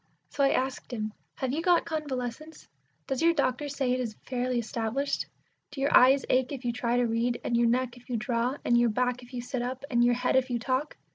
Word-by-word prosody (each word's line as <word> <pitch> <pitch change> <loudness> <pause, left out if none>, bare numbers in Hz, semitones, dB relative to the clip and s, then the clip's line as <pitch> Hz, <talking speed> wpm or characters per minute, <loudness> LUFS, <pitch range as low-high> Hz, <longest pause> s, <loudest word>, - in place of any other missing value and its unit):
So 280 - 0
I 275 - +5
asked 260 0 -1
him, 215 -3 -3 0.2
"Have 260 -1 -2
you 315 - -1
got 350 0 +3
convalescence? 300 0 -5 0.4
Does 265 - -2
your 335 0 +4
doctor 285 0 0
say 270 -2 -1
it 255 - +1
is 230 -4 -3
fairly 250 -1 -1
established? 235 +4 -2 0.4
Do 295 - -9
your 275 +1 +2
eyes 265 +2 +6
ache 255 +1 +2
if 265 -3 -6
you 240 - 0
try 240 0 0
to 245 - +3
read, 235 +1 0
and 235 - 0
your 235 0 +4
neck 245 0 0
if 245 +1 -18
you 240 - 0
draw, 235 +4 -1
and 240 - +3
your 240 0 +4
back 250 +2 0
if 245 0 -14
you 245 -2 -5
sit 250 0 -3
up, 255 +2 -4
and 240 -1 +4
your 240 0 +4
head 250 +1 0
if 260 0 +3
you 245 - 0
talk? 260 +5 -2
250 Hz, 235 wpm, -28 LUFS, 240-270 Hz, 0.4 s, eyes